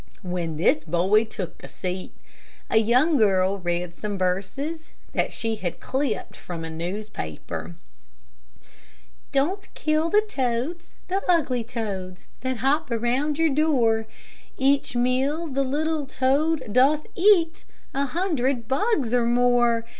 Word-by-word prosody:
When 175 -3 -3
this 155 -1 +3
boy 180 +7 +3
took 195 -5 -7
a - - -7
seat, 185 0 -5 0.6
a - - +4
young 250 +8 +4
girl 195 -3 +3
read 175 -1 -2
some 205 +2 -4
verses 200 - -2 0.2
that - - 0
she 225 -1 -2
had 180 -5 -4
clipped 265 -3 -2
from 165 -2 -6
a 160 - -6
newspaper: 170 - -5 1.6
"Don't 350 +9 0
kill 310 +1 +1
the 420 +3 +4
toads, 265 - -2
the 385 +2 0
ugly 275 -9 +2
toads, 200 -6 -5
That 260 -1 -2
hop 275 +6 +1
around 250 +6 0
your 325 -3 +2
door; 240 -8 +2 0.5
Each 275 -1 +2
meal 260 +6 +1
the 275 -3 -1
little 300 +2 -1
toad 280 +3 +1
doth 280 +5 +4
eat 350 -4 +3 0.3
A 275 +1 +1
hundred 270 - 0
bugs 280 - +1
or 245 -1 +3
more. 240 -1 +3
250 Hz, 130 wpm, -25 LUFS, 205-300 Hz, 1.6 s, a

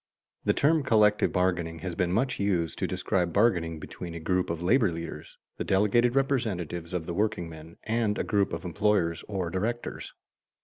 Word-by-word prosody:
_ - - -35
The - - +3
term 155 +2 +3
collective 105 -5 +3
bargaining 90 -3 0
has 90 - -2
been 90 +1 0
much 125 +7 0
used 90 -5 0
to - - 0
describe 90 -2 0
bargaining 85 -5 +2
between 85 +2 -8
a - - -5
group 90 +3 0
of 85 0 -3
labor 110 +1 +3
leaders, 85 0 -7 0.2
the - - -2
delegated 110 +6 +3
representatives 105 - -1
of 90 -3 -2
the 85 - -4
workingmen, 85 -6 -3
and 110 -1 0
a - - 0
group 100 -3 +1
of 85 +1 -5
employers 90 -1 +1
or 95 -5 -3
directors. 115 +7 -3
95 Hz, 175 wpm, -28 LUFS, 85-110 Hz, 0.2 s, The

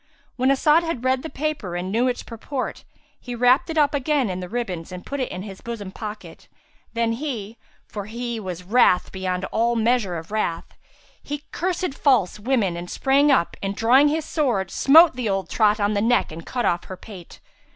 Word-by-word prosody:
When 260 +1 +1
As'ad 300 +4 +4
had 330 -8 -4
read 260 0 +2
the 320 - -6
paper 285 - -3
and 180 +2 -3
knew 235 +4 +2
its 245 -1 -2
purport, 250 +3 -5 0.4
he 245 -1 -7
wrapped 250 +6 +3
it 320 - -3
up 295 -1 +3
again 280 -5 +1
in 180 - -4
the 180 -1 -6
ribbons 190 -8 -4
and 180 0 -8
put 280 - -4
it 255 - -2
in 185 +1 -5
his 195 -2 -9
bosom 220 -5 -6
pocket: 210 +1 -9 0.5
then 230 -1 0 0.7
(for 205 -2 -6
he 235 +1 -4
was 180 -3 -6
wrath 185 -2 +3
beyond 185 -1 -3
all 235 +2 +1
measure 225 -6 +1
of 165 +4 -9
wrath) 175 -6 -2 0.5
he 290 0 -6
cursed 360 -2 -2
false 250 -10 +2
women 210 -6 0
and 175 +1 -7
sprang 280 +2 +3
up 260 -11 +2
and 195 0 -3
drawing 255 +7 +5
his 310 +1 -1
sword, 245 - 0
smote 320 +2 +6
the 245 -4 -2
old 195 -3 -2
trot 215 -1 +3
on 205 +1 +1
the 205 - 0
neck 240 -3 +2
and 165 +1 -9
cut 245 -2 -2
off 170 0 0
her 185 - -8
pate. 185 -4 -12
230 Hz, 195 wpm, -23 LUFS, 190-270 Hz, 0.7 s, smote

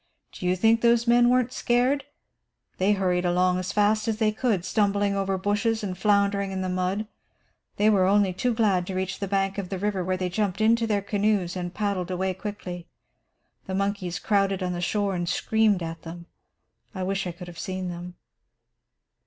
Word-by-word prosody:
Do 180 - -5
you 180 - +2
think 225 +4 +3
those 235 0 +4
men 240 0 +5
weren't 250 0 +2
scared? 255 +3 +1 0.7
They 195 +3 +3
hurried 180 -3 0
along 180 +1 +2
as 185 - -3
fast 215 +1 +2
as 220 -1 0
they 215 -1 +2
could, 215 -5 -1
stumbling 200 0 +1
over 195 -1 0
bushes 210 +3 0
and 190 -3 -3
floundering 200 0 +2
in 190 0 -3
the 185 - -2
mud. 185 +3 -1 0.7
They 210 - +2
were 195 -4 +4
only 200 -1 +3
too 250 +7 0
glad 195 -6 +2
to 190 - -4
reach 185 0 -3
the 200 - -3
bank 195 0 0
of 185 -3 -5
the 195 - -3
river, 195 -1 -1
where 185 +1 -1
they 185 0 -1
jumped 190 +1 -1
into 230 +1 +3
the 205 -2 0
canoes 200 -3 0
and 175 -1 -4
paddled 200 -2 -2
quickly 190 +1 -4
away. 175 -1 -9 0.8
The 190 - -3
monkeys 200 -2 -1
crowded 195 -2 +1
on 180 0 -1
the 175 - -4
shore 200 +2 0
and 175 -1 -2
screamed 215 -5 +2
at 165 0 -6
them. 170 +1 -9 0.7
I 190 - -3
wish 195 0 -1
I - - -3
could 175 +1 -10
have 170 -1 -10
seen 185 -1 -4
them." 175 +1 -7
195 Hz, 195 wpm, -25 LUFS, 185-210 Hz, 0.8 s, men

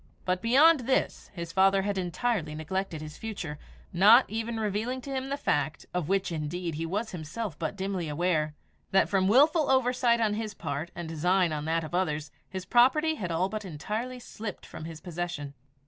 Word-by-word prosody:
But 180 0 0
beyond 285 +8 +6
this 265 - 0
his 170 -2 -5
father 195 +1 +4
had 205 0 -1
entirely 180 -2 -1
neglected 165 +1 -3
his 150 -1 -9
future, 185 -9 -5 0.3
not 210 +8 +7
even 225 +1 -3
revealing 220 +4 -1
to 275 - -7
him 265 0 -3
the 280 - -1
fact 150 - -1
of 180 -3 -2
which, 195 -1 +1
indeed, 165 +2 -3
he 165 +2 -3
was 210 +6 -2
himself 180 +2 -5
but 165 +3 -2
dimly 190 -4 -3
aware 155 -1 0 0.3
that 195 - +3
from 190 -1 +2
wilful 295 - +5
oversight 250 -2 +3
on 220 -2 +2
his 215 -1 -4
part 145 +1 -4
and 175 -1 -5
design 175 +2 +2
on 150 0 -3
that 165 +1 0
of 160 - -8
others, 155 -5 -1 0.2
his 185 -1 -5
property 265 +8 +4
had 195 - -4
all 170 +3 +1
but 215 +2 -5
entirely 215 - -4
slipped 220 -4 -7
from 155 - -9
his 160 -1 -8
possession. 175 -5 -4
190 Hz, 185 wpm, -28 LUFS, 165-225 Hz, 0.3 s, not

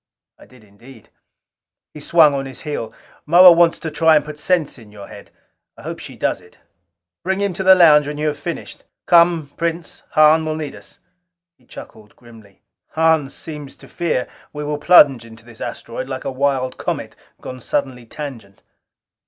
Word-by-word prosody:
I - - -17
did 125 -3 -20
indeed. 110 +3 -18 0.8
He 150 - -10
swung 155 0 +4
on 135 -1 -3
his 130 - -10
heel. 145 -7 -5 0.4
"Moa 175 +3 +8
wants 170 0 +3
to 160 - -5
try 160 +1 +3
and 150 -1 +1
put 150 0 -9
sense 160 -5 -1
in 110 -3 -16
your 100 -1 -12
head - - -13 0.5
I - - -14
hope - - -7
she - - -10
does - - -2
it. 90 0 -22 0.7
Bring 190 +2 -2
him 200 -2 -1
to 180 - -5
the 190 0 +7
lounge 150 -5 +5
when 150 0 -6
you 150 - -3
have 150 -1 -2
finished. 170 - -7 0.2
Come, 170 -4 +3
Prince, 170 0 -4
Hahn 155 +1 +5
will 155 0 -3
need 155 -2 -6
us." - - -14 0.5
He 125 - -31
chuckled 105 -1 -13
grimly. 115 -5 -19 0.3
"Hahn 160 -3 +2
seems 150 -1 -9
to - - -16
fear 170 -7 -2 0.2
we 150 0 -7
will 150 0 -4
plunge 145 -7 +5
into 115 0 -16
this 115 -2 -15
asteroid - - -6
like - - -7
a - - -3
wild 130 -1 -2
comet - - -5 0.2
gone 130 0 -9
suddenly 125 -2 -4
tangent!" 115 -9 -10
150 Hz, 180 wpm, -19 LUFS, 125-160 Hz, 0.8 s, Moa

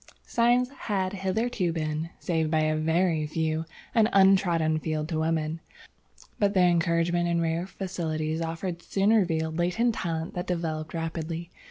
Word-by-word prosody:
"Science 245 +1 +3 0.2
had 190 -2 0
hitherto 195 0 -1
been, 155 0 -2
save 160 -3 0
by 155 0 +2
a 155 0 +1
very 160 0 +1
few, 160 +1 -1 0.3
an 225 -2 +4
untrodden 180 -5 +4
field 155 -1 -2
to 160 -2 -2
women, 160 0 -1 0.8
but 205 0 +2
the 185 - +5
encouragement 175 0 +2
and 170 0 +1
rare 165 +2 -1
facilities 160 -5 -3
offered 165 +2 -4
soon 195 +4 +1
revealed 165 -6 +1
latent 220 +8 +2
talent 165 -4 -3
that 180 - -4
developed 160 -3 -3
rapidly. 165 +1 -4
170 Hz, 145 wpm, -27 LUFS, 160-185 Hz, 0.8 s, the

